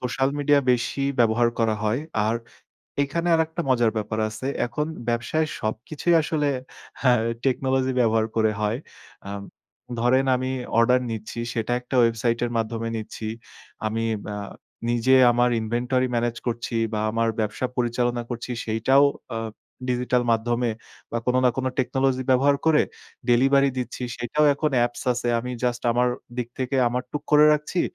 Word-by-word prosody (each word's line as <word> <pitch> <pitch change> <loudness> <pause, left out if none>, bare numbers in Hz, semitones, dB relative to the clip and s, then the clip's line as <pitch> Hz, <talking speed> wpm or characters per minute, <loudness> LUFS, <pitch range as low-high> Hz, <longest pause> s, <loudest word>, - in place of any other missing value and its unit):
Social 135 +2 0
media 145 0 +4
বেশি 125 +3 -1 0.2
ব্যবহার 115 +1 +4
করা 110 -2 +2
হয়। 110 +5 +1 0.3
আর 110 +2 +1 0.7
এইখানে 170 +5 -1
আরেকটা 160 +1 -1
মজার 120 -3 +3
ব্যাপার 110 +1 -3
আছে। 110 +4 -6 0.2
এখন 150 +5 -2 0.2
ব্যবসায় 120 +7 0
সবকিছুই 125 +10 -1
আসলে 150 -1 0 0.5
হ্যাঁ, 125 -4 +4 0.2
টেকনোলজি 130 0 +1
ব্যবহার 110 -2 +3
করে 110 -1 +3
হয়। 105 +3 0 0.5
আ - - -5 0.7
ধরেন 130 +3 +3
আমি 130 +1 -2 0.3
অর্ডার 125 +2 +5
নিচ্ছি, 110 +1 -5
সেটা 115 0 -1
একটা 125 +2 -8
ওয়েবসাইটের 115 +1 +1
মাধ্যমে 115 0 -2
নিচ্ছি। 110 0 -6 0.6
আমি 115 +1 -1 0.3
আ - - -4 0.5
নিজে 120 +2 +3 0.2
আমার 120 +1 +3
ইনভেন্টরি 125 +3 0
ম্যানেজ 120 0 0
করছি 120 0 -2 0.2
বা 105 - -1
আমার 115 0 +1
ব্যবসা 110 +4 -1
পরিচালনা 120 0 0
করছি, 120 +1 -5
সেইটাও 115 +6 +3 0.3
আ - - -1 0.5
ডিজিটাল 125 0 +1
মাধ্যমে 120 +1 0 0.4
বা 115 - 0
কোন 125 - +2
না 125 - +6
কোন 130 - -1
টেকনোলজি 130 +1 +1
ব্যবহার 140 +2 +4
করে 155 -2 +5 0.5
ডেলিভারি 135 +3 +4
দিচ্ছি। 125 0 -4
সেটাও 120 +6 0
এখন 150 +1 0
অ্যাপস 120 0 0
আছে। 120 0 -2
আমি 125 +2 -5
জাস্ট 120 -1 -1
আমার 125 +1 +2 0.3
দিক 120 -1 -2
থেকে 130 +1 -1
আমার 125 +1 -2
টুক 150 - -3
করে 150 0 +8
রাখছি, 150 +4 0
125 Hz, 150 wpm, -24 LUFS, 115-130 Hz, 0.7 s, করে